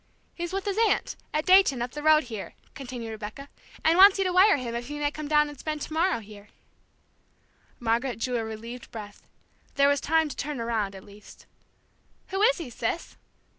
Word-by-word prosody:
"He's 345 0 -5
with 390 +1 -3
his 405 +1 -1
aunt, 455 - +1 0.2
at 305 - -1
Dayton, 370 -8 +5
up 240 +1 -3
the 295 - -6
road 310 0 +5
here," 225 -5 -8 0.2
continued 245 -4 -7
Rebecca; 220 +6 -8 0.3
"and 330 +3 +3
wants 395 +1 +9
you 390 - +1
to 365 -1 -1
wire 385 +1 +6
him 245 -3 -5
if 240 0 -4
he 295 +1 -6
may 290 0 0
come 305 -1 -6
down 300 0 +3
and 290 -2 -10
spend 305 -1 -4
tomorrow 320 -1 0
here." 205 -1 -14 1.3
Margaret 235 0 0
drew 245 +2 -1
a 225 - -2
relieved 230 +3 -8
breath. 210 -2 -9 0.5
There 280 0 +4
was 285 -1 +1
time 320 +1 +2
to 290 - -7
turn 290 -2 -4
around, 220 -4 -2
at 190 - -11
least. 205 0 -16 0.8
"Who 385 +1 -2
is - - +4
he, 320 -9 -7
sis?" 235 +8 -4
280 Hz, 195 wpm, -26 LUFS, 230-320 Hz, 1.3 s, wants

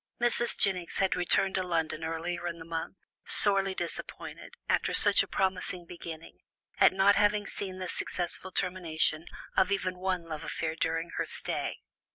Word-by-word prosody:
Mrs. 240 0 +1
Jennings 180 -3 0
had 190 -1 +1
returned 185 +2 +2
to 190 - 0
London 165 -3 -2
earlier 165 +2 -3
in 170 -1 -4
the 165 - -10
month, 165 +3 -5 0.3
sorely 195 -2 +6
disappointed, 170 -2 -6
after - - +1
such - - +5
a - - -3
promising 185 -2 -1
beginning, 165 - -9 0.4
at - - +7
not 195 +2 +4
having 205 0 +2
seen 190 -1 -5
the 185 -1 -5
successful 180 +1 -2
termination 170 -3 0 0.3
of 190 +1 +3
even 185 -2 -1
one 185 -2 -1
love 155 -2 -6
affair 160 -1 -3
during 165 +1 -2
her - - 0
stay. - - -3
180 Hz, 160 wpm, -29 LUFS, 165-190 Hz, 0.4 s, at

